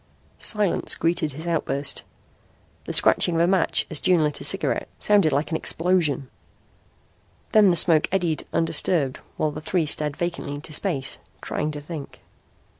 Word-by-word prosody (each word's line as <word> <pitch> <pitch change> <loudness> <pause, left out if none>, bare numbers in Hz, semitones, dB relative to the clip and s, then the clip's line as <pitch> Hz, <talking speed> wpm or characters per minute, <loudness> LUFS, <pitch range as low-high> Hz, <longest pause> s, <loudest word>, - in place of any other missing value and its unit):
Silence 210 -5 +1
greeted 165 -3 0
his 160 +5 -8
outburst. 145 -4 0 0.8
The - - -5
scratching 175 - +4
of 165 - +2
a - - +4
match 185 -1 +2
as 155 - -1
June 180 -4 +3
lit 150 -1 -1
a - - -6
cigarette - - 0
sounded 200 -7 +3
like 145 +5 -1
an 160 - 0
explosion. 165 -7 +2 1.2
Then 210 -2 +6
the 175 - +3
smoke 160 -1 +4
eddied 175 -5 -1
undisturbed 165 -4 0 0.2
while 155 - 0
the 155 - -8
three 165 +1 0
stared 150 -1 -2
vacantly 170 -4 -4
into 155 +2 -7
space, 145 -7 -2 0.2
trying 150 - -3
to 145 - -7
think. 150 -1 -9
160 Hz, 155 wpm, -23 LUFS, 150-175 Hz, 1.2 s, Then